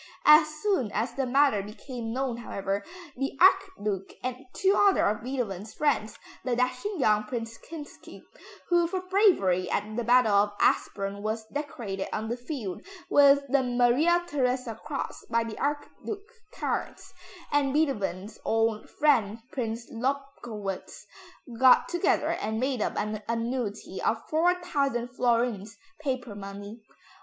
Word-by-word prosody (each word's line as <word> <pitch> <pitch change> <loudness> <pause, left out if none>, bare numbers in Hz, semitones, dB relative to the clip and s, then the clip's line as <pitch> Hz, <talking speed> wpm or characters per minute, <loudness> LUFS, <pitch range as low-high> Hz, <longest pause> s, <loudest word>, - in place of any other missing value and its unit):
As 305 +1 +8 0.2
soon 335 - +1
as 230 +3 -1
the 270 0 -1
matter 270 -4 +4
became 225 +3 -7
known, 255 -1 -2
however, 200 -3 -3 0.3
the 270 +2 -3
Archduke 365 - +2
and 255 +1 -4
two 390 +4 +2
other 400 -1 +4
of 210 +1 0
Beethoven's 220 -5 -4
friends, 285 -8 0 0.3
the 250 -2 0
dashing 255 - -1
young 215 -4 +3
Prince 230 0 -5
Kinsky 310 -3 -11 0.5
(who 345 -1 +4
for 370 +2 -2
bravery 360 - +3
at 215 +1 -2
the 240 - -1
battle 240 -2 +4
of 205 +1 +3
Aspern 200 0 +1
was 220 +1 -3
decorated 235 -10 -4
on 220 +1 -3
the 235 - -1
field 245 - -5 0.3
with 280 0 +6
the 275 +1 +3
Maria 250 +8 +3
Theresa 255 -5 0
cross 275 +6 -6
by 230 0 +2
the 225 -1 -7
Archduke 395 +9 -4 0.2
Charles), - - -4 0.4
and 285 -2 +2
Beethoven's 215 - -1
old 225 -1 0
friend 235 -8 +2
Prince 235 -2 -3
Lobkowitz 240 -6 -4 0.5
got 260 -1 +6
together 350 +2 +1
and 220 +1 -2
made 255 -2 0
up - - -1
an 215 0 -2
annuity 230 -4 -3
of 220 0 -1
4,000 310 -7 +1
florins, 235 -4 0 0.2
paper 255 -6 -3
money. 200 +2 -8
245 Hz, 135 wpm, -28 LUFS, 215-280 Hz, 0.5 s, As